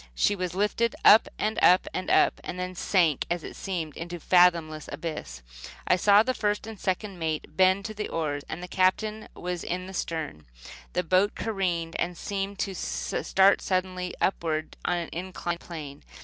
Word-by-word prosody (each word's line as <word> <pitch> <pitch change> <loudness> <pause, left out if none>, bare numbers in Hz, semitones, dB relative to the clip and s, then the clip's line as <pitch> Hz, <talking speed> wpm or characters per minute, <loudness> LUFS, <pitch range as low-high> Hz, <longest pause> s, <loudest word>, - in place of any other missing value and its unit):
She 205 - +2
was 180 -2 -3
lifted 210 +4 +1
up, 220 - +8
and 215 +1 -1
up, 180 +1 +6
and 185 - -3
up, - - +3
and 180 - -6
then 180 0 -3
sank, 175 -5 +1
it 175 -1 -3
seemed, 170 -6 -4
into 175 +1 -6
a - - -8
fathomless 170 -3 +3
abyss. 60 - -6 0.4
I - - +5
saw 200 +3 +5
the 255 +2 0
first 210 -3 -1
and 220 -2 -9
second 190 0 -2
mate 160 -2 -3
bend 190 +1 +4
to 215 - -4
the 210 0 -4
oars. 150 -3 -2
The 180 +2 -5
Captain 210 +4 +1
was 180 -1 -4
in 180 +1 -3
the 190 - -9
stern. 155 - -4 0.5
The 180 - 0
boat 185 +4 +2
careened 180 -6 -2
and 175 0 -2
seemed 200 +1 -3
to 195 - -2
start 170 - +2
suddenly 185 -1 -2
upward 160 -4 -1
on 175 - +1
an 170 -1 -4
inclined 175 -1 -4
plane. 150 -5 -8
180 Hz, 175 wpm, -27 LUFS, 165-195 Hz, 0.5 s, up